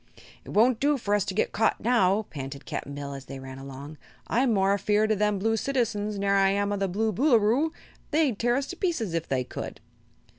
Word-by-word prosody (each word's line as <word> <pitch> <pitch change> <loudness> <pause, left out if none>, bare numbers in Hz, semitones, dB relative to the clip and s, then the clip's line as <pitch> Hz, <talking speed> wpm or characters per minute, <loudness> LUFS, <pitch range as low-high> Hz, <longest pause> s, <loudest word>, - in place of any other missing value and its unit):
"It - - -13
won't 230 +2 +3
do 290 +1 +2
for 205 -5 -2
us 205 -2 +3
to 190 - -4
get - - +1
caught 220 +1 +1
now," 215 -3 +3
panted 140 -1 -7
Cap'n 140 - -5
Bill, 140 -1 -5
as 135 -1 -8
they 135 - -8
ran 130 0 -9
along. 140 +3 -9 0.3
"I'm 245 +2 +2
more 195 -2 +3
afeared 210 +2 +2
o' - - +3
them 210 0 +1
Blue 225 +3 +1
citizens 220 -4 -1
ner 200 0 +1
I 195 -1 +4
am 200 +1 0
o' - - -1
the 195 0 0
Blue 215 +4 0
Boolooroo. 250 - +3 0.4
They'd 295 -8 +1
tear 240 +1 +2
us 275 +1 0
to - - -5
pieces, 325 - -1
if 165 -1 -2
they 130 -1 0
could." - - -7
205 Hz, 220 wpm, -27 LUFS, 180-235 Hz, 0.4 s, I